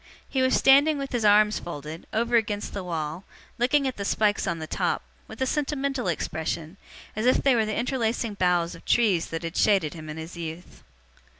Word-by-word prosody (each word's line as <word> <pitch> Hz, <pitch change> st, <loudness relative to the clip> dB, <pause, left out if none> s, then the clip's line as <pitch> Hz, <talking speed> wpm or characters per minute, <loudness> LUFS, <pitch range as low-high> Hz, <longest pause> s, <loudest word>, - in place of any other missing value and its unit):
He 265 Hz, -, -1 dB
was 260 Hz, 0 st, +3 dB
standing 285 Hz, +3 st, +5 dB
with 275 Hz, -1 st, -5 dB
his 240 Hz, -3 st, -1 dB
arms 210 Hz, 0 st, +5 dB
folded, 155 Hz, -1 st, -8 dB
over 235 Hz, +2 st, 0 dB
against 210 Hz, -2 st, 0 dB
the 200 Hz, -, -4 dB
wall, 165 Hz, 0 st, -4 dB, 0.4 s
looking 270 Hz, +3 st, +2 dB
at 260 Hz, -, -4 dB
the 200 Hz, -, -3 dB
spikes 205 Hz, +1 st, +1 dB
on 170 Hz, -3 st, -1 dB
the 160 Hz, -, -5 dB
top, -, -, -1 dB, 0.2 s
with -, -, -11 dB
a -, -, +1 dB
sentimental 275 Hz, -4 st, -1 dB
expression, 160 Hz, +1 st, -3 dB, 0.4 s
as 215 Hz, +3 st, 0 dB
if 255 Hz, -, +3 dB
they 275 Hz, -, +5 dB
were 225 Hz, -3 st, +2 dB
the 215 Hz, -, -2 dB
interlacing 235 Hz, -3 st, -1 dB
boughs 180 Hz, -3 st, +1 dB
of -, -, -12 dB
trees 205 Hz, -8 st, +2 dB
that 165 Hz, +1 st, -5 dB
had 165 Hz, +1 st, -5 dB
shaded 190 Hz, -8 st, +2 dB
him 155 Hz, -2 st, -9 dB
in 150 Hz, -, -6 dB
his 160 Hz, +2 st, -8 dB
youth. 165 Hz, 0 st, -8 dB
205 Hz, 200 wpm, -26 LUFS, 170-245 Hz, 0.4 s, standing